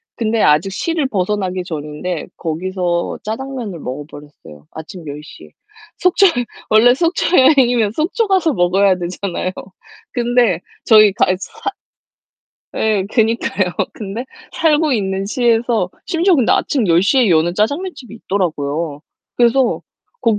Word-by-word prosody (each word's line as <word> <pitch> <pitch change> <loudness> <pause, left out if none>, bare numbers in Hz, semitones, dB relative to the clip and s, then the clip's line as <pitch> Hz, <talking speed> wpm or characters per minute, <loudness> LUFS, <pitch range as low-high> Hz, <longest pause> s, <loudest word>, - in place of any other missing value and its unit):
근데 225 -1 0
아직 155 +6 +3
시를 315 - -1
벗어나기 190 -4 -2
전인데 155 +1 -5
거기서 175 +1 -2
짜장면을 230 -4 -5
먹어버렸어요 145 - -10
아침 165 +2 -10
10:00 145 - -9
에. - - -17 0.5
속초에 365 +2 +4 0.4
원래 225 +3 +6
속초 335 +3 +1
여행이면 245 -6 +4
속초 385 - 0
가서 370 -5 +2
먹어야 190 0 +3
되잖아요. 180 +1 -4 0.6
근데 240 -6 +1 0.3
저희가 215 -4 +5
이 185 - -1
사 425 - -6 1.1
예. 215 -3 +1
그니까요. 225 -5 +1 0.2
근데 215 +3 -6 0.3
살고 310 -2 +2
있는 195 -2 -2
시에서 230 -3 +1 0.2
심지어 355 +1 +2
근데 260 -7 +3
아침 255 -7 +1
10:00 185 +10 +3
에 245 -4 +4
여는 170 0 +2
짜장면 285 - -1
집이 235 -5 -12
있더라고요. 160 -7 -2 0.4
그래서 240 +1 +2 0.4
거 225 -2 +2
210 Hz, 285 characters per minute, -17 LUFS, 175-250 Hz, 1.1 s, 원래